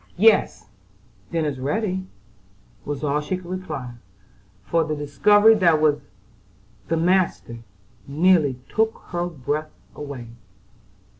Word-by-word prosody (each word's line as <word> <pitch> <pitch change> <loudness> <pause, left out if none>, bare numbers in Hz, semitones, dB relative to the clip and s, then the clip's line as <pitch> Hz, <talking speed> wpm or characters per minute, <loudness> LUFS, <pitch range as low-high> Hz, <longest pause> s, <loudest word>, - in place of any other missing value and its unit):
"Yes; 215 - +3 0.6
dinner's 150 -5 -1
ready," 185 +6 -2 0.8
was 145 0 -4
all 150 0 0
she 185 +5 -3
could 185 - -13
reply, 170 -9 -5 0.7
for 165 +10 +1
the 155 -1 -3
discovery 205 +10 +4
that 180 -6 +4
this 155 - +2
was 150 -1 +2 0.9
the 165 - 0
"master," 170 -9 0 0.5
nearly 155 -2 +3
took 220 0 0
her 175 0 -2
breath 155 -1 -3 0.2
away. 140 -5 -8
160 Hz, 115 wpm, -23 LUFS, 145-185 Hz, 0.9 s, discovery